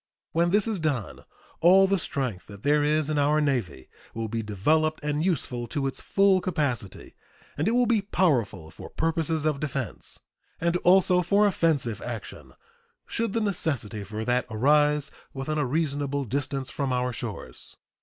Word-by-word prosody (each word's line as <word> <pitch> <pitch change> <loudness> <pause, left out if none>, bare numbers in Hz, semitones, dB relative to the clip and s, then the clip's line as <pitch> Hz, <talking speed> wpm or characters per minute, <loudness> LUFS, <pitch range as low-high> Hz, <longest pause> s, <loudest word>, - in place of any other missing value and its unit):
When 170 +1 +2
this 205 +4 +2
is 215 -4 -1
done, 145 -9 -2 0.3
all 185 +3 +6
the 195 0 +1
strength 130 - -3
that 100 0 -12
there 145 +1 +3
is 150 0 +2
in 155 -1 0
our 150 +2 +3
Navy 120 - -1 0.3
will 115 0 -2
be 115 +1 -2
developed 155 +10 +1
and 150 +1 -1
useful 125 -9 -1
to 135 +4 -2
its 135 - -3
full 195 -1 +3
capacity, 140 - -3 0.4
and 150 - -1
it 225 - +2
will 245 0 +4
be 230 -3 +2
powerful 130 - 0
for - - -10
purposes 160 -1 -1
of 150 -3 +1
defense, 135 -5 -4 0.4
and 170 +1 +1
also 180 0 +4
for 200 +4 +3
offensive 150 - +1
action, 120 -3 -7 0.5
should 230 -3 -2
the 230 - 0
necessity 140 - -2
for 110 +3 -5
that 125 +1 +1
arise 150 +5 +2 0.2
within 150 +3 -2
a 145 - 0
reasonable 145 -1 -1
distance 135 +2 -2
from 140 -2 -2
our 125 0 0
shores. 115 -3 -6
145 Hz, 165 wpm, -26 LUFS, 125-170 Hz, 0.5 s, all